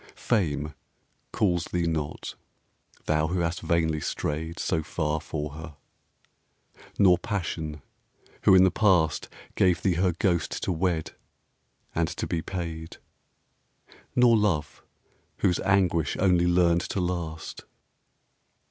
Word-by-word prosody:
Fame 75 -9 -1 0.6
calls 90 -5 +1
thee 85 -1 -1
not, 80 -2 -3 0.7
thou 75 0 +1
who 90 +2 -1
hast 85 0 -2
vainly 80 -3 +1
strayed 80 +3 -3
So 80 - 0
far 80 -2 -2
for 75 -1 -4
her; 80 0 -9 1.2
nor 90 -3 +5
Passion, 80 - -4 0.6
who - - +7
in 95 - +7
the 95 - +4
past 90 -6 +2 0.2
Gave 90 -3 +2
thee 95 - +3
her 90 -2 +2
ghost 85 -2 -1
to - - 0
wed 85 -2 -1 0.8
and 80 0 +1
to - - -4
be 80 - -2
paid; 80 -3 -6 1.2
Nor 125 -2 +6
Love, 85 -9 0 0.6
whose 90 -3 +1
anguish 90 -6 +1
only 90 -2 +3
learned 85 -1 +3
to 95 - -3
last. 85 -3 -4
85 Hz, 120 wpm, -27 LUFS, 80-90 Hz, 1.2 s, who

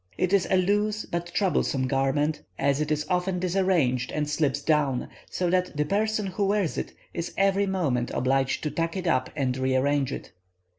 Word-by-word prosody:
It 185 +1 0
is 195 -2 +3
a 190 - +4
loose 210 +3 +1
but 170 0 -4
troublesome 170 -8 +1
garment, 145 +3 +1 0.2
as 140 +1 +1
it 150 - -1
is 150 0 0
often 180 0 0
disarranged 175 -9 +1
and 150 -1 -1
slips 145 -2 0
down, 145 -4 +1 0.2
so 180 - -1
that 180 -4 0
the 150 - +1
person 215 +4 0
who 195 +1 -1
wears 200 -5 +1
it - - -4 0.2
is 170 0 -4
every 195 +1 +3
moment 145 -11 0
obliged 135 +1 0
to 150 - -1
tuck 165 +2 -2
it 185 - -4
up 130 -6 +1
and 130 -4 0
rearrange 130 +1 +1
it. - - -6
160 Hz, 185 wpm, -26 LUFS, 135-190 Hz, 0.2 s, a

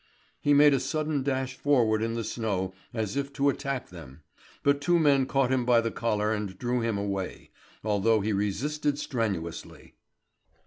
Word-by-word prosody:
He 145 0 +4
made 145 0 +7
a 135 - +2
sudden 150 +2 -1
dash 130 -1 -1
forward 115 -7 +2
in 115 +1 -1
the 115 - -2
snow 100 -5 -2 0.2
as 110 -2 -3
if 140 0 -2
to 140 0 +2
attack 140 -2 -3
them; 80 -4 -12 0.4
but 140 0 +2
two 175 +4 +3
men 140 -5 +3
caught 135 -2 +1
him 130 -2 +2
by 120 -1 +4
the 115 0 -1
collar 105 -2 0
and 105 -3 -4
drew 125 +3 -1
him 115 -2 -1
away, 100 -2 -4 0.3
although 110 +1 +2
he 105 +2 -1
resisted 145 +9 -1
strenuously. 100 - -4
120 Hz, 170 wpm, -28 LUFS, 105-140 Hz, 0.4 s, made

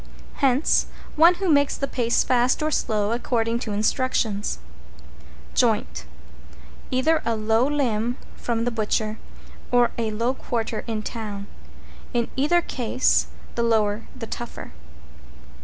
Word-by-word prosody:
Hence, 270 +1 +3 0.3
one 335 +3 +7
who 385 +1 -2
makes 285 -3 +3
the 275 - -1
pace 235 -3 +1
fast 255 +4 +2
or 310 - 0
slow, 210 -6 0
according 235 -1 0
to 230 -3 -4
instructions. 215 - 0 1.0
=JOINT= 205 - +1 0.8
Either 310 +5 +2
a 230 - 0
low 220 +3 +2
limb 245 -5 0 0.2
from 230 -1 -2
the 245 - 0
butcher, 215 -1 -1 0.5
or 245 -1 +4
a 225 -1 0
low 230 +4 0
quarter 230 -4 -3
in 220 -2 -2
town; 210 -4 -5 0.7
in 235 -1 0
either 320 +6 +3
case 250 -2 +1 0.3
the 235 - -1
lower 220 -2 +1
the 250 -3 -6
tougher. 240 +1 -7
235 Hz, 125 wpm, -24 LUFS, 220-255 Hz, 1.0 s, one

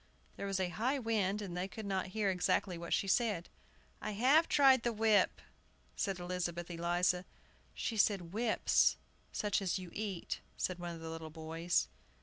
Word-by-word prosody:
There 200 - -4
was 195 -1 -1
a 185 -1 0
high 245 +9 0
wind, 210 -4 0
and 180 -3 -6
they 180 +1 -2
could 220 +2 -8
not 190 -1 -1
hear 205 -3 +2
exactly 180 0 +1
what 170 0 -7
she 195 - +2
said. 205 -5 +1 0.5
"I 215 - -3
have 270 +10 +4
tried 270 -3 +6
the 235 - 0
whip," 220 -2 +3 0.6
said 195 -3 -1
Elizabeth 175 -1 -3
Eliza. 175 +1 +1 0.5
"She 225 - -2
says 205 -1 +4
'whips,' 215 +7 +2 0.3
such 205 -1 0
as 190 -2 0
you 180 -2 -8
eat," 205 -5 -3 0.2
said 185 -1 -2
one 175 -1 -5
of 165 - -10
the 165 - -6
little 160 -1 -6
boys. 160 - -1
190 Hz, 170 wpm, -34 LUFS, 175-215 Hz, 0.6 s, tried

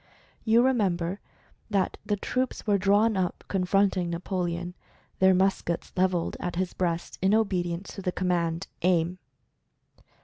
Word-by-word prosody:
You 230 +1 +4
remember 195 -7 +1 0.5
that 195 -3 +1
the 205 - 0
troops 255 +5 -2
were 205 -2 +2
drawn 205 +3 +3
up 185 -2 -1
confronting 190 -1 +1
Napoleon, 175 0 -3 0.5
their 190 0 +5
muskets 185 -2 0
leveled 180 -2 +1
at 175 -1 -3
his 185 0 -1
breast 170 -2 -2
in 190 +3 +4
obedience 185 -4 -1
to 195 - -7
the 180 - -1
command 175 -1 -1 0.2
"Aim!" 175 0 +1
185 Hz, 130 wpm, -27 LUFS, 175-200 Hz, 0.5 s, their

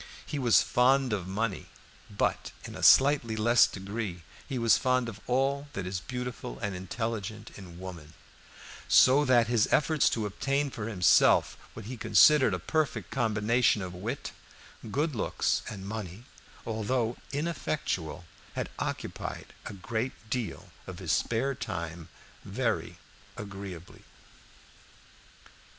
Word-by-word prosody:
He 145 - -4
was 120 -4 +5
fond 130 0 +3
of 95 -4 -3
money; 95 -1 -2 0.4
but 100 - -1
in - - -8
a - - -7
slightly 135 -5 +5
less 115 +2 +5
degree 100 -2 -5 0.3
he 135 - -2
was 115 -2 +5
fond 130 -1 +1
of 110 -2 -7
all 135 +3 +1
that 95 - -4
is 90 0 -3
beautiful 125 - -6
and 100 +6 -3
intelligent 110 +2 -4
in 90 -4 -11
woman; 85 -4 -9 0.7
so 135 +3 +6
that 120 -3 +5
his 115 -2 +2
efforts 155 -1 +3
to 110 -2 -2
obtain 140 +7 -1
for 110 -3 -5
himself 95 -7 +4 0.2
what - - -8
he 125 +3 -6
considered 130 -4 +5
a - - -2
perfect 155 - -2
combination 115 -2 +2
of 90 -1 -6
wit, 90 - -5 0.6
good 145 +7 0
looks, 115 - 0
and 100 -3 -7
money, 105 -1 -6 0.4
although 115 +2 -1 0.2
ineffectual, 140 - -3 0.3
had - - -3
occupied - - -5
a - - -6
great 110 +6 -3 0.2
deal 125 -4 -4 0.2
of 90 -2 -7
his 90 -4 -3
spare 120 - +1
time 85 -7 -6 0.3
very - - -2 0.4
agreeably. 95 -4 -8
110 Hz, 130 wpm, -29 LUFS, 95-130 Hz, 0.7 s, so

